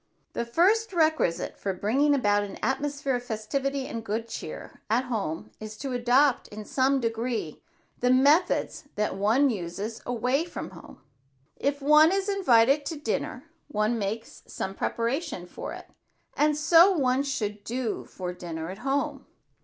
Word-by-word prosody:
The 235 - -2
first 390 - +2
requisite 315 - +1
for 195 - -2
bringing 275 +10 +2
about 205 -6 +2
an 200 -1 -6
atmosphere 275 +1 0
of 245 - -8
festivity 260 +4 -2
and 230 -3 -5
good 225 +2 -3
cheer - - -8
at 235 +4 +2
home 205 -11 -3
is 215 0 -8
to 270 +2 -4
adopt 250 +2 +3
in 210 0 -9
some 270 +3 +2
degree 230 - -3 0.4
the 250 - +2
methods 285 +5 +3
that 210 -2 -1
one 225 +8 +3
uses 200 +3 -5
away 250 +5 0
from 345 - -7
home. - - -14 0.5
If 280 0 -2
one 300 +3 +7
is 390 +1 0
invited 275 - +4
out 285 - -20
to 330 - -3
dinner, 290 - -3 0.2
one 225 -3 0
makes 215 +3 -4
some 190 - -4
preparation 235 - -2
for - - -7
it, - - -9 0.5
and 300 0 +2
so 330 +4 +7
one 260 -2 +2
should 210 -7 -3
do 240 0 -3
for 180 -1 -6
dinner 165 -1 -6
at 195 - -9
home. 275 +2 -2
245 Hz, 155 wpm, -27 LUFS, 215-285 Hz, 0.5 s, one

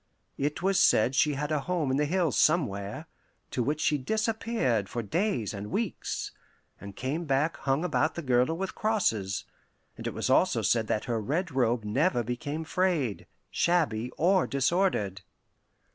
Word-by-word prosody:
It 145 +5 -2
was 195 0 +3
said 115 +4 +4
she 145 +2 +3
had 150 +2 -3
a 155 - +2
home 155 -1 -1
in 135 - +1
the 150 - +2
hills 175 -1 +1
somewhere, 130 - +1 0.5
to 125 - -1
which 145 +5 -1
she 150 -1 +1
disappeared 215 - 0
for 120 - -3
days 125 - -1
and 100 0 -6
weeks, 220 - -3 0.5
and 100 -1 -9
came 150 +7 -3
back 145 +2 +1
hung 135 +4 0
about 155 -3 +1
the 170 - -5
girdle 130 +5 +2
with 190 +1 -3
crosses; 110 - 0 0.5
and - - -6
it - - -3
was - - -1
also - - +3
said 115 -2 +2
that 105 - -1
her 115 -2 -1
red 160 - -1
robe 120 -3 +1
never 120 - +1
became 145 +7 -4
frayed, 160 - 0 0.2
shabby, 145 -10 +1
or 185 +2 +3
disordered. 135 - 0
145 Hz, 160 wpm, -28 LUFS, 120-175 Hz, 0.5 s, said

